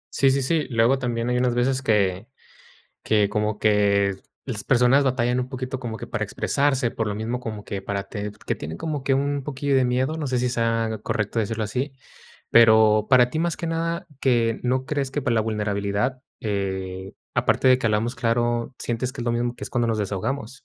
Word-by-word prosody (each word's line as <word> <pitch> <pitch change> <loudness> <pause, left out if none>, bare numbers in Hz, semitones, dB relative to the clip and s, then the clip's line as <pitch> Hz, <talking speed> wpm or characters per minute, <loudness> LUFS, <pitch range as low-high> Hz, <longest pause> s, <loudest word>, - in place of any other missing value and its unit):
Sí, 135 - +4
sí, 135 0 +1
sí. 155 0 0
Luego, 120 +2 +3
también 120 -1 -1
hay 125 - +1
unas 125 -1 +1
veces 130 +2 +1
que 100 -3 +1 0.7
que 105 -2 +2
como 105 0 -1
que 100 -2 +3 0.3
las 110 -6 -3
personas 130 +2 +4
batallan 125 -1 +1
un 125 +1 -3
poquito, 130 -1 -4
como 115 -3 -5
que - - -7
para - - -3
expresarse, 135 -4 0
por 115 -2 -2
lo 105 - -2
mismo, 115 +3 -3
como 110 -4 -6
que 100 -1 -5
para 100 0 -3
ted 105 -1 -6
que - - 0
tienen 80 +2 -7
como 150 -4 -3
que 135 -1 +2
un 140 0 -1
poquillo 140 0 -1
de 130 -1 +4
miedo, 130 +5 0
no 150 - -2
sé 125 -1 0
si 125 0 +1
sea 115 -2 0
correcto 105 +1 -1
decirlo 110 0 -1
así. 130 +7 -3 0.6
Pero 110 -2 +6
para 125 -1 +6
ti, 155 - -3
más 170 0 -1
que 170 - -3
nada, 165 +2 -2
que 120 -4 +2
no 130 +1 0
crees 140 -3 -1
que 145 - -2
para 125 -3 0
la 110 - +2
vulnerabilidad, 105 +3 -1 0.2
eh, 95 -2 -3 0.2
aparte 130 - +2
de 130 - +7
que 125 - -1
hablamos 110 +3 0
claro, 120 +1 0
¿sientes 120 +2 -2
que 135 - -7
es 120 - -4
lo 120 - +2
mismo 120 +1 -1
que - - -14
es - - -6
cuando 120 -2 0
nos 110 -1 0
desahogamos? 110 +6 -3
120 Hz, 210 wpm, -24 LUFS, 105-130 Hz, 0.7 s, de